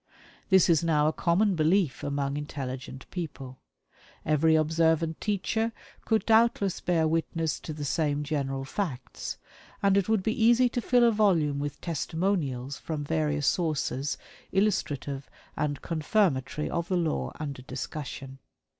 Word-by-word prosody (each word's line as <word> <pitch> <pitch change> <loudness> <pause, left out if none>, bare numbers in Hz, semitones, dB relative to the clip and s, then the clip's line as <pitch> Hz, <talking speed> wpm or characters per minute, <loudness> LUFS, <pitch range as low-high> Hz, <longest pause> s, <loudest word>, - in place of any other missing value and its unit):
This 190 -2 +6
is 165 -2 +4
now 150 -3 +3
a 155 - +1
common 190 +6 +2
belief 165 -1 +2
among 140 -1 -1
intelligent 130 -3 -6
people. 140 -7 -6 0.7
Every 155 +1 +4
observant 160 +1 +2
teacher 220 +3 0 0.3
could 220 -1 +1
doubtless 220 -4 +3
bear 165 -3 +2
witness 165 0 -1
to - - -7
the 150 -1 -5
same 145 0 0
general 135 -3 -2
facts, 135 -5 -4 0.5
and 200 -1 +4
it 200 0 +2
would 220 -4 +2
be 220 +1 0
easy 240 +2 +5
to 245 - -2
fill 245 +1 +3
a 235 - +6
volume 170 -10 +2
with 145 0 -4
testimonials 160 -5 -2
from 155 -2 -4
various 150 -1 0
sources 145 -5 0 0.3
illustrative 145 -9 -1 0.3
and 145 -3 -2
confirmatory 155 - 0
of 170 0 -2
the 185 - +1
law 165 -3 -1
under 140 -4 -5
discussion. 135 +1 -6
160 Hz, 135 wpm, -28 LUFS, 145-190 Hz, 0.7 s, This